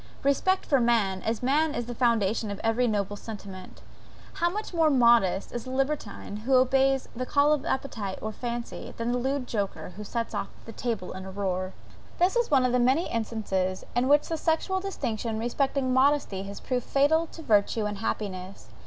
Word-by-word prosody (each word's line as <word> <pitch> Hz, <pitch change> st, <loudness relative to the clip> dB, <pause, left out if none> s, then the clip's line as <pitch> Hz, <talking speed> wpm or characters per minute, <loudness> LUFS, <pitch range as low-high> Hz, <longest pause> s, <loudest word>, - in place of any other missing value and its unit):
Respect 375 Hz, +7 st, +2 dB
for 275 Hz, -, +3 dB
man, 220 Hz, -6 st, +2 dB
as 225 Hz, +3 st, -2 dB
man 295 Hz, +4 st, +2 dB
is 240 Hz, -, -2 dB
the 240 Hz, -, -5 dB
foundation 225 Hz, -3 st, +1 dB
of 200 Hz, -, -5 dB
every 225 Hz, +2 st, +2 dB
noble 205 Hz, -2 st, -1 dB
sentiment. 200 Hz, -3 st, -9 dB, 0.5 s
How 345 Hz, -, +1 dB
much 420 Hz, +2 st, -5 dB
more 325 Hz, -2 st, +4 dB
modest 235 Hz, -8 st, +4 dB
is 240 Hz, -, -5 dB
the -, -, -7 dB
libertine 265 Hz, -6 st, -2 dB
who 250 Hz, +5 st, +1 dB
obeys 265 Hz, +1 st, +3 dB
the 255 Hz, -, -2 dB
call 290 Hz, +1 st, +4 dB
of 290 Hz, -3 st, -1 dB
appetite 220 Hz, -8 st, -2 dB
or 215 Hz, -, -4 dB
fancy, 235 Hz, +1 st, -5 dB
than 230 Hz, +1 st, -1 dB
the 245 Hz, -, 0 dB
lewd 265 Hz, +1 st, -1 dB
joker 205 Hz, -5 st, -3 dB
who 210 Hz, -, -6 dB
sets 230 Hz, +2 st, -3 dB, 0.3 s
the 230 Hz, -, -8 dB
table 225 Hz, -5 st, -3 dB
in 190 Hz, 0 st, -7 dB
a -, -, -6 dB
roar. 185 Hz, -1 st, -2 dB, 0.4 s
This 360 Hz, +6 st, +3 dB
is 480 Hz, -1 st, +2 dB
one 265 Hz, -3 st, +4 dB
of 250 Hz, -, +2 dB
the 250 Hz, -, +2 dB
many 260 Hz, +8 st, +2 dB
instances 200 Hz, -5 st, -2 dB
in 245 Hz, +1 st, +2 dB
which 290 Hz, +1 st, +4 dB
the 325 Hz, -, -2 dB
sexual 325 Hz, +4 st, 0 dB
distinction 235 Hz, -, -3 dB
respecting 260 Hz, +3 st, 0 dB
modesty 260 Hz, -7 st, +2 dB
has 200 Hz, -, -7 dB
proved 250 Hz, -2 st, -2 dB
fatal 320 Hz, +4 st, +3 dB
to 325 Hz, -, -11 dB
virtue 210 Hz, -2 st, +2 dB
and 205 Hz, -1 st, -3 dB
happiness. 185 Hz, -, -4 dB
240 Hz, 190 wpm, -27 LUFS, 210-275 Hz, 0.5 s, more